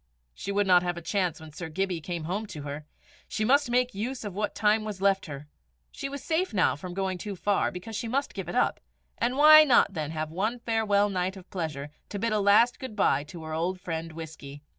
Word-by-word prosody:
She 200 - -5
would 205 0 +2
not 180 -2 +6
have 175 -1 -2
a - - -5
chance 180 -4 -1
when 160 -1 -11
Sir 165 +1 -6
Gibbie 180 0 -2
came 170 0 -4
home 195 +7 -3
to 150 -7 -8
her. 145 +1 -6 0.4
She 215 - -2
must 280 +3 +3
make 250 +1 +1
use 225 +4 -4
of 205 - -5
what 210 +2 -2
time 215 +1 +2
was 210 -3 -5
left 195 -1 +2
her. 145 0 -8 0.4
She 275 - -5
was 280 0 -7
safe 335 - -1
now 185 - +3
from 175 +4 -8
going 190 -1 -2
too 205 +2 -5
far, 200 +2 +1
because 180 +5 -8
she 230 - -3
must 275 +5 -1
give - - -5
it - - -4
up; - - +2 0.4
and 245 +3 0
why 310 +1 +9
not 245 -8 +4
then 155 -4 -3
have 155 -1 -4
one 210 +8 -1
farewell 220 -3 +1
night 185 0 -2
of 185 -1 -13
pleasure, 150 -5 -4 0.2
to 205 - -4
bid 230 +2 0
a 215 - +2
last 205 +4 +4
good 260 -5 -7
bye 145 -8 +2
to 160 +2 -10
her 160 0 -6
old 175 +4 -1
friend 165 -2 -5
Whisky? 150 -3 -9
195 Hz, 235 wpm, -27 LUFS, 165-220 Hz, 0.4 s, why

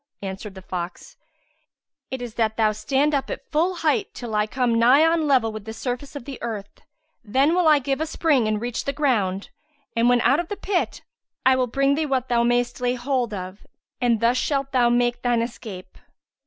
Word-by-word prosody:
Answered 195 +1 -6
the 190 - -10
fox, 175 -1 -6 0.9
"It 260 -1 -4
is 240 -2 -7
that 220 -2 0
thou 215 -1 +3
stand 275 +7 0
up 275 -2 0
at - - -6
full 335 +4 +1
height 350 +5 +1
till 235 -3 -6
I 210 0 +1
come 240 -1 +1
nigh 260 +7 +6
on 330 +1 +3
a - - 0
level 255 -6 +3
with 215 -1 -8
the 220 - -6
surface 255 +4 -5
of 280 - -7
the 275 -3 -8
earth. 215 -4 -6 0.4
Then 265 +8 +2
will 355 -2 +3
I 305 -1 +7
give 275 +1 -2
a 320 - -1
spring 295 -7 +2
and 215 -1 0
reach 240 +1 -3
the 280 - -1
ground; 205 -10 0 0.4
and, 230 +1 +3
when 245 0 +4
out 270 +7 +3
of 345 - -2
the 410 - -5
pit, 385 -3 -2 0.4
I 260 0 +6
will 255 -1 +1
bring 275 +3 +2
thee 310 +1 0
what 260 -2 -1
thou 240 -1 +3
mayst 240 +1 +1
lay 245 0 +1
hold 250 -2 -1
of, 185 0 -7 0.3
and 235 -3 +2
thus 235 +2 +3
shalt 275 0 -1
thou 245 -2 +3
make 240 0 +1
thine 240 -2 +1
escape." 215 -6 -8
245 Hz, 210 wpm, -23 LUFS, 225-280 Hz, 0.9 s, I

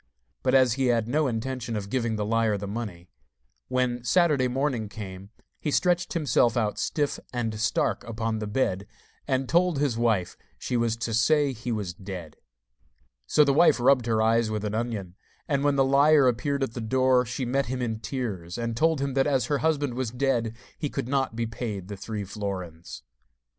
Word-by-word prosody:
But - - +2
as 130 -3 +5
he 130 +1 0
had 115 -2 +2
no 150 +4 +1
intention 120 0 -3
of 100 -1 -5
giving 115 -4 0
the 105 -1 -2
liar 110 -1 +1
the 100 - -5
money, 100 -4 -6 0.6
when 125 -1 0
Saturday 150 -3 +3
morning 125 -4 -1
came 100 -2 -8 0.3
he 150 - -2
stretched 175 +3 +1
himself 125 -7 +2
out 110 -3 0
stiff 145 -2 -1
and 120 -3 -2
stark 120 +3 0
upon 115 -1 -2
the 105 - -4
bed, 105 -4 -1 0.4
and 130 -1 0
told 175 0 +2
his 135 -5 0
wife 110 -7 +1 0.2
she 125 - -3
was 115 -1 +1
to 115 -1 -3
say 145 +4 +3
he 120 +1 -5
was 105 -6 -3
dead. 90 -4 -8 0.9
So 150 - +5
the 140 -1 +3
wife 165 -2 +5
rubbed 125 -1 +4
her 110 -1 +2
eyes 115 0 +3
with 110 -1 -3
an 105 - -2
onion, 110 -6 -3 0.3
and 140 -3 0
when 145 -1 +3
the 135 -1 +4
liar 140 +1 +5
appeared 135 +3 0
at 130 - -3
the 120 - -5
door, 130 +2 +3
she 125 +2 -4
met 135 +3 0
him 130 +1 -3
in 115 -3 -2
tears, 105 -9 -4
and 115 -1 -2
told 160 +3 +2
him 140 -1 -1
that 135 +1 +2
as 135 -5 +2
her 145 -2 0
husband 145 -5 0
was 125 -1 -2
dead 120 -2 0 0.2
he 150 - -2
could 135 -3 -4
not 135 -3 0
be 115 0 -1
paid 105 -4 -5
the 100 - -5
three 105 +1 -5
florins. 95 -5 -6
120 Hz, 195 wpm, -26 LUFS, 110-135 Hz, 0.9 s, as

